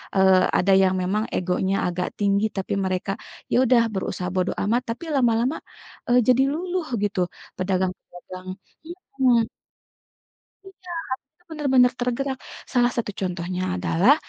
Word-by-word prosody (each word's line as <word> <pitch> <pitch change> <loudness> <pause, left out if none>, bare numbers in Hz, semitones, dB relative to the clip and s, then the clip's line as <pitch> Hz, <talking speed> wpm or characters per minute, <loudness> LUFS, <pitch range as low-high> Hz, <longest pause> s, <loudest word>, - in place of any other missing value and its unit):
eee, 190 -1 +5
ada 195 +2 +2
yang 190 0 +3
memang 200 +4 0
egonya 185 +2 0
agak 180 0 -2
tinggi 200 +1 +2
tapi 195 - -2
mereka 185 +1 -1 0.4
ya - - +2
udah 240 -2 +5
berusaha 185 -1 -3
bodo 185 0 +1
amat 230 +5 +2
tapi 335 - -13
lama-lama, 245 +2 +2 0.5
eee, 245 +1 +5
jadi 255 +1 +5
luluh 360 +1 -2 0.2
gitu 200 -2 -1 0.4
pedagang-pedagang 185 0 -3 0.7
mhm. 240 -3 +4 1.2
Iya, 385 -1 -15 0.6
benar-benar 265 -5 +3
tergerak 260 +2 -1 0.4
salah 245 -1 +3
satu 225 -3 -2
contohnya 180 -1 -3 0.2
adalah, 195 - +4
205 Hz, 120 wpm, -24 LUFS, 185-250 Hz, 1.2 s, eee